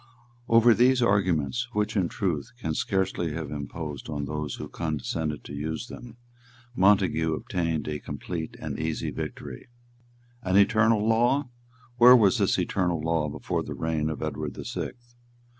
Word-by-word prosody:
Over 115 Hz, +1 st, +6 dB
these 125 Hz, +3 st, +4 dB
arguments, 95 Hz, -, +1 dB
which 105 Hz, +1 st, -1 dB
in 95 Hz, -5 st, +1 dB
truth 85 Hz, -8 st, -2 dB
can 80 Hz, -9 st, -2 dB
scarcely 95 Hz, -3 st, -1 dB
have 80 Hz, -2 st, -5 dB
imposed 75 Hz, 0 st, -6 dB
on 75 Hz, -2 st, -3 dB
those 75 Hz, -1 st, -4 dB
who -, -, -7 dB
condescended 75 Hz, -1 st, -3 dB
to -, -, -9 dB
use 80 Hz, -, -4 dB
them, 120 Hz, -1 st, -10 dB, 0.6 s
Montague 95 Hz, -5 st, +3 dB
obtained 80 Hz, -2 st, -2 dB
a 75 Hz, -1 st, -3 dB
complete 80 Hz, +1 st, -6 dB
and -, -, -5 dB
easy 80 Hz, 0 st, -2 dB
victory. 65 Hz, -3 st, -7 dB, 0.7 s
"An 95 Hz, -3 st, +1 dB
eternal 110 Hz, +1 st, +4 dB
law! 120 Hz, +5 st, +2 dB, 0.5 s
Where 125 Hz, +1 st, +10 dB
was 105 Hz, -6 st, +4 dB
this -, -, +2 dB
eternal 90 Hz, -3 st, 0 dB
law 80 Hz, -1 st, 0 dB
before -, -, -3 dB
the -, -, -6 dB
reign 80 Hz, -1 st, -1 dB
of 80 Hz, -, -4 dB
Edward -, -, -4 dB
the -, -, -7 dB
Sixth? 120 Hz, -1 st, -6 dB
85 Hz, 150 wpm, -26 LUFS, 75-110 Hz, 0.7 s, Where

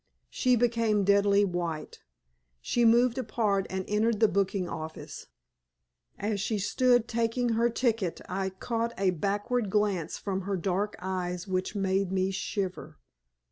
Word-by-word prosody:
She 250 Hz, -1 st, +2 dB
became 230 Hz, -3 st, +2 dB
deadly 200 Hz, +1 st, +4 dB
white; 175 Hz, -4 st, -4 dB, 0.6 s
she 240 Hz, -, +1 dB
moved 240 Hz, +2 st, +4 dB
apart 215 Hz, -5 st, 0 dB
and 190 Hz, 0 st, -3 dB
entered 215 Hz, +1 st, +1 dB
the 220 Hz, -, +6 dB
booking 195 Hz, -1 st, 0 dB
office. 160 Hz, -1 st, -7 dB, 0.9 s
As 205 Hz, -1 st, -2 dB
she 215 Hz, +1 st, -1 dB
stood 245 Hz, +4 st, +2 dB
taking 235 Hz, +1 st, 0 dB
her 230 Hz, +1 st, +2 dB
ticket 225 Hz, -7 st, 0 dB
I 190 Hz, +1 st, -2 dB
caught 230 Hz, +4 st, -3 dB
a 190 Hz, -1 st, +2 dB
backward 205 Hz, +6 st, -1 dB
glance 200 Hz, -5 st, 0 dB
from 195 Hz, -1 st, -3 dB
her 195 Hz, +1 st, -2 dB
dark 190 Hz, +4 st, -1 dB
eyes 180 Hz, 0 st, -3 dB
which 185 Hz, +2 st, -2 dB
made 195 Hz, -1 st, 0 dB
me 190 Hz, 0 st, +1 dB
shiver. 190 Hz, -1 st, -4 dB
200 Hz, 140 wpm, -28 LUFS, 190-230 Hz, 0.9 s, the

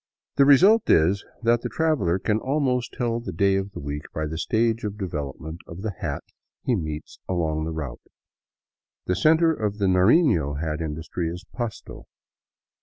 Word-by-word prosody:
The 140 Hz, -, +6 dB
result 195 Hz, +11 st, +6 dB
is 90 Hz, +6 st, +4 dB, 0.2 s
that 120 Hz, 0 st, +3 dB
the -, -, -3 dB
traveler 150 Hz, -, +1 dB
can 105 Hz, +3 st, 0 dB
almost 130 Hz, -3 st, 0 dB
tell 120 Hz, -2 st, -1 dB
the 110 Hz, -5 st, -6 dB
day 95 Hz, +3 st, +2 dB
of 95 Hz, +1 st, -2 dB
the -, -, -6 dB
week 70 Hz, +1 st, -4 dB
by 80 Hz, -, -1 dB
the 80 Hz, +1 st, -4 dB
stage 115 Hz, +3 st, +1 dB
of 105 Hz, -1 st, -4 dB
development 80 Hz, -3 st, -5 dB
of 85 Hz, +4 st, -9 dB
the 110 Hz, -, -1 dB
hats -, -, -5 dB, 0.3 s
he 125 Hz, -, +1 dB
meets 75 Hz, -5 st, -5 dB
along 80 Hz, -4 st, 0 dB
the 80 Hz, -, -3 dB
route. 75 Hz, -6 st, -5 dB, 1.0 s
The 90 Hz, -, 0 dB
center 160 Hz, -, +4 dB
of 105 Hz, -7 st, -2 dB
the 100 Hz, -, 0 dB
Narino 90 Hz, -, +3 dB
hat 80 Hz, 0 st, -2 dB
industry 80 Hz, +2 st, -3 dB
is 90 Hz, +3 st, -7 dB
Pasto. 120 Hz, -4 st, -6 dB
95 Hz, 170 wpm, -24 LUFS, 80-120 Hz, 1.0 s, The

